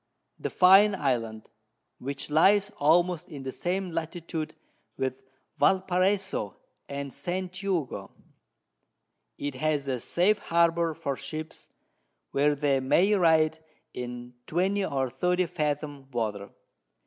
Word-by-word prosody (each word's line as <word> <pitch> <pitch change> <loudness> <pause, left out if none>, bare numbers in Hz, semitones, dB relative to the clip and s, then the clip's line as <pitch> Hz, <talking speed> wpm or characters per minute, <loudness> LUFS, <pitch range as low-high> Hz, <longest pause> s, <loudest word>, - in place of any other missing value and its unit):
The - - -3
Fine 195 +3 +6
Island, 115 - -2 0.5
which 140 +2 -5
lies 200 +6 +4
almost 170 +3 +2
in 140 -2 -8
the 130 - -4
same 180 +5 -2
Latitude 165 -1 -4 0.4
with 130 0 -2 0.4
Val 190 -1 +5
Paraiso 190 +2 0 0.3
and 140 -1 -5
St. 180 +5 -3
Jugo: 180 -7 -2 1.3
It 145 -1 -3
has 145 +1 -1
a 130 -2 -1
safe 190 - +2
Harbour 170 -2 +2
for 140 -2 -3
Ships, 155 +3 -7 0.6
where 145 +1 +2
they 140 -2 +1
may 175 +10 +3
ride 160 -4 +3 0.3
in 125 0 -6
20 190 +4 +1
or 135 -6 -1
30 180 +7 +1
Fathom 150 -4 -3
Water. 105 -5 -3
155 Hz, 115 wpm, -28 LUFS, 135-180 Hz, 1.3 s, Fine